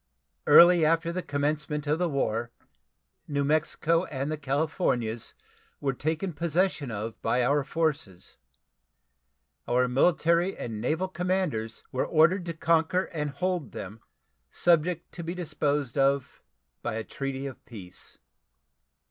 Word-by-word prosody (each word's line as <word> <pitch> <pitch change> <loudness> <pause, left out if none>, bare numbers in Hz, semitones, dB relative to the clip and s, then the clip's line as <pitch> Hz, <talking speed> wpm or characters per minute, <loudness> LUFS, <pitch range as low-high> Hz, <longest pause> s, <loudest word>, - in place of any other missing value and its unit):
Early 175 -1 +8
after 165 +2 +2
the 185 +2 -2
commencement 150 0 -2
of 150 +2 0
the 180 -1 +1
war 120 -5 -1 0.8
New 140 -1 0
Mexico 160 +3 +1
and 140 +1 -3
the - - 0
Californias 135 - -1 0.4
were 135 -1 0
taken 160 +7 -2
possession 165 -2 0
of 110 +1 -5
by 120 +2 +1
our 145 +2 +2
forces. 140 - -2 1.3
Our 125 +1 +2
military 170 +7 +2
and 110 -3 -5
naval 160 +9 0
commanders 180 -12 -2
were 130 - 0
ordered 170 +3 +4
to 170 -2 -4
conquer 165 +3 +1
and 150 -2 -2
hold 180 +1 -2
them, 105 +4 -8 0.5
subject 170 - +1
to 170 - -7
be 170 +2 -4
disposed 150 -5 -1
of 135 -1 +1 0.4
by - - -3
a 110 - -3
treaty 135 +2 -5
of 135 -2 -8
peace. 95 -6 -10
150 Hz, 130 wpm, -27 LUFS, 130-170 Hz, 1.3 s, Early